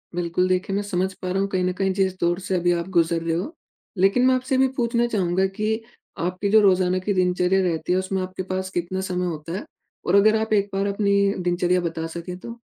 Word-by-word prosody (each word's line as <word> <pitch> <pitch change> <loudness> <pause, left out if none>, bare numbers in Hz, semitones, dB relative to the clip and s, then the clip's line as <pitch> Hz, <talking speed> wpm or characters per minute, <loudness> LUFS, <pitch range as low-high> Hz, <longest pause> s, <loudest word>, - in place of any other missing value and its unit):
बिल्कुल, 175 +1 0
देखिए 185 +2 0
मैं 205 - 0
समझ 190 -1 -1
पा 185 0 -6
रहा 190 - 0
हूँ, 195 - 0
कहीं 185 -2 0
न 180 0 0
कहीं 190 +1 0
जिस 190 -1 0
दौर 175 +2 +1
से 190 -1 -2
अभी 175 0 +2
आप 170 +1 -2
गुज़र 165 0 +2
रहे 165 0 -1
हो। 195 - -3 0.4
लेकिन 195 +7 +3
मैं 260 0 +5
आपसे 255 +1 -1
ये - - +2
भी 265 - +5
पूछना 235 0 +1
चाहूँगा 190 -4 +1
कि 220 +1 0 0.4
आपकी 185 +3 -2
जो 220 - +7
रोज़ाना 185 -2 +3
की 200 +2 -1
दिनचर्या 180 0 +2
रहती 165 -2 -1
है, - - +2
उसमें 190 0 -2
आपके 185 0 -5
पास 185 0 -2
कितना 175 +2 -2
समय 180 -1 -2
होता 165 -1 -5
है? - - -7 0.4
और 185 - +2
अगर 215 +2 +5
आप 220 0 -1
एक 200 -1 +2
बार 195 +1 0
अपनी 200 0 +2
दिनचर्या 180 0 +1
बता 165 -1 -3
सकें 170 +2 -7
तो? 235 +3 -9
185 Hz, 235 wpm, -23 LUFS, 180-200 Hz, 0.4 s, जो